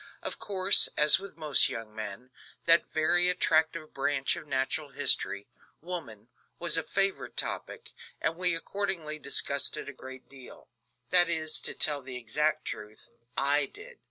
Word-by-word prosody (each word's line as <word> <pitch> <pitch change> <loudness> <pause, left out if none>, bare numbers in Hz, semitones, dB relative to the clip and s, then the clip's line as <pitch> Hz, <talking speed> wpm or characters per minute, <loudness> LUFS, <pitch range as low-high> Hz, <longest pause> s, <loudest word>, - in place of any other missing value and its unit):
Of - - -5
course, 195 -1 +3
as 150 +2 +6
with 195 -4 -12
most 155 -3 +3
young 115 -2 -8
men, 110 +3 -8 0.3
that 165 0 +4
very 175 +3 +3
attractive 160 -2 0
branch 135 0 -1
of - - -10
natural 135 +2 -2
history, 100 -6 +2 0.3
woman, 150 - -9 0.3
was 170 0 +3
a 165 - +10
favorite 195 +3 -2
topic, 450 -1 -5 0.3
and - - -2
we 180 -1 +1
accordingly 165 -4 -4
discussed 140 0 0
it - - -7
a 140 - -8
great 130 0 -12
deal; 135 -2 -14 0.4
that 175 -1 +7
is, 160 -2 +2
to - - -3
tell 145 -2 +2
the 130 -1 -8
exact 150 +7 -2
truth, 105 +1 -8 0.3
I 140 +1 +1
did. 480 +3 -14
155 Hz, 155 wpm, -28 LUFS, 135-175 Hz, 0.4 s, a